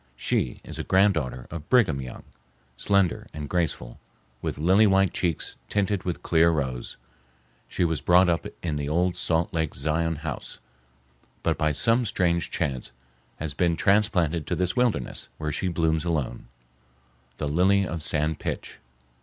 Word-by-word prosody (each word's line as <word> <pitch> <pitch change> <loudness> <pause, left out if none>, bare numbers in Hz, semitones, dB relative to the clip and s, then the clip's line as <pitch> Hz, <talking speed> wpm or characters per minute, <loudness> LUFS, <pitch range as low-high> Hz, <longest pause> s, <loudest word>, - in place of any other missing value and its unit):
She - - -1
is - - -8
a - - -2
granddaughter 95 -11 +2
of 80 -2 -7
Brigham 95 - +3
Young, 65 -1 -8 0.5
slender 100 +3 +1
and 75 -1 -5
graceful, 80 -8 -2 0.4
with - - -3
lily 95 +8 +5
white 95 -2 +3
cheeks 85 -4 -2
tinted 100 -2 0
with 90 -2 -3
clear 85 0 +4
rose, 65 -6 -2 0.7
She 90 - 0
was 80 -2 -1
brought 90 +1 +5
up 85 -1 0 0.2
in 80 -4 -1
the 70 0 -3
old 90 +3 +1
Salt 80 0 0
Lake 80 -2 -1
Zion 80 +4 0
House, 75 0 -6 0.9
but - - +2
by 75 0 +1
some 115 - +2
strange 85 -4 +1
chance 65 -4 -2 0.5
has 75 -1 -3
been 85 +2 +1
transplanted 90 -6 +2
to - - 0
this 90 0 -1
wilderness, 120 - 0
where 75 -1 -3
she 85 +5 -1
blooms 80 -2 +1
alone, 75 -10 -2 0.9
the 75 - -2
"Lily 95 +6 +3
of 85 -3 -4
San 75 +1 +1
Pitch." - - -5
85 Hz, 155 wpm, -26 LUFS, 75-90 Hz, 0.9 s, lily